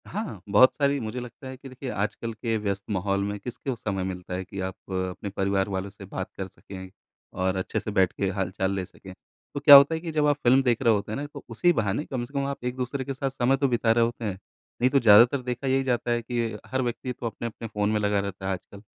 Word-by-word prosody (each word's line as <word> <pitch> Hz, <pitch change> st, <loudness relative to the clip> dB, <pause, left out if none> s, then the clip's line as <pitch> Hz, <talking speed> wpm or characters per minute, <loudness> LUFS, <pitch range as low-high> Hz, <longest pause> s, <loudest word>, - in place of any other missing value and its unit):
हाँ, 195 Hz, -, -5 dB
बहुत 105 Hz, +6 st, +6 dB
सारी 140 Hz, -1 st, +1 dB
मुझे 115 Hz, +1 st, -4 dB
लगता 125 Hz, +2 st, -9 dB
है 130 Hz, 0 st, -7 dB
कि 135 Hz, +1 st, -11 dB
देखिए, 130 Hz, +1 st, -7 dB
आजकल 115 Hz, +2 st, -3 dB
के 115 Hz, +1 st, -2 dB
व्यस्त 100 Hz, -2 st, -2 dB
माहौल 100 Hz, 0 st, 0 dB
में 100 Hz, 0 st, -3 dB
किसको 125 Hz, +4 st, -5 dB
समय 100 Hz, -5 st, -3 dB
मिलता 90 Hz, -1 st, -5 dB
है 90 Hz, +1 st, -2 dB
कि 100 Hz, -, -8 dB
आप 95 Hz, 0 st, -3 dB, 0.2 s
अपने 95 Hz, +2 st, -3 dB
परिवार 95 Hz, 0 st, 0 dB
वालों 95 Hz, 0 st, -3 dB
से 100 Hz, 0 st, -12 dB
बात 95 Hz, 0 st, -5 dB
कर 95 Hz, -, -4 dB
सकें 95 Hz, 0 st, -11 dB, 0.4 s
और 95 Hz, 0 st, 0 dB
अच्छे 95 Hz, -, -2 dB
से 105 Hz, -, -5 dB
बैठ 95 Hz, -3 st, +3 dB
के 100 Hz, -, -1 dB
हाल-चाल 95 Hz, 0 st, -1 dB
ले 95 Hz, -1 st, -2 dB
सकें। 95 Hz, 0 st, -13 dB, 0.4 s
तो -, -, -3 dB
क्या 145 Hz, 0 st, +10 dB
होता 140 Hz, +3 st, +8 dB
है -, -, -3 dB
कि 165 Hz, -1 st, -5 dB
जब 150 Hz, -1 st, +1 dB
आप 145 Hz, -, +4 dB
फ़िल्म 130 Hz, +2 st, +5 dB
देख 120 Hz, -3 st, +1 dB
रहे 115 Hz, -, +5 dB
होते 105 Hz, 0 st, -2 dB
हैं -, -, -2 dB
ना, 145 Hz, -, -3 dB
तो 145 Hz, -1 st, -11 dB
उसी 175 Hz, +10 st, +3 dB
बहाने 115 Hz, -, -1 dB
कम 130 Hz, -3 st, -3 dB
से 125 Hz, -, -20 dB
कम 140 Hz, -1 st, 0 dB
आप 140 Hz, -2 st, -5 dB
एक-दूसरे 125 Hz, +2 st, -3 dB
के 135 Hz, -, -3 dB
साथ 135 Hz, +1 st, -2 dB
समय 135 Hz, 0 st, +1 dB
तो 140 Hz, +1 st, +2 dB
बिता 120 Hz, -2 st, +2 dB
रहे 115 Hz, +1 st, +4 dB
होते 115 Hz, 0 st, -4 dB
हैं। 100 Hz, -3 st, -3 dB, 0.4 s
नहीं 125 Hz, -, +5 dB
तो 140 Hz, -, +4 dB
ज़्यादातर 120 Hz, +4 st, +6 dB
देखा 125 Hz, +2 st, -4 dB
यही 135 Hz, 0 st, +2 dB
जाता 120 Hz, -2 st, 0 dB
है 120 Hz, 0 st, +1 dB
कि 115 Hz, -2 st, -2 dB
हर 130 Hz, 0 st, -1 dB
व्यक्ति 125 Hz, +1 st, -3 dB
तो 120 Hz, -, -8 dB
अपने-अपने 115 Hz, 0 st, -5 dB
फ़ोन 105 Hz, -1 st, -1 dB
में 110 Hz, -, +1 dB
लगा 105 Hz, -1 st, +1 dB
रहता 100 Hz, -1 st, -5 dB
है 95 Hz, -, +1 dB
आजकल। 100 Hz, +2 st, -9 dB
115 Hz, 255 wpm, -26 LUFS, 100-130 Hz, 0.4 s, क्या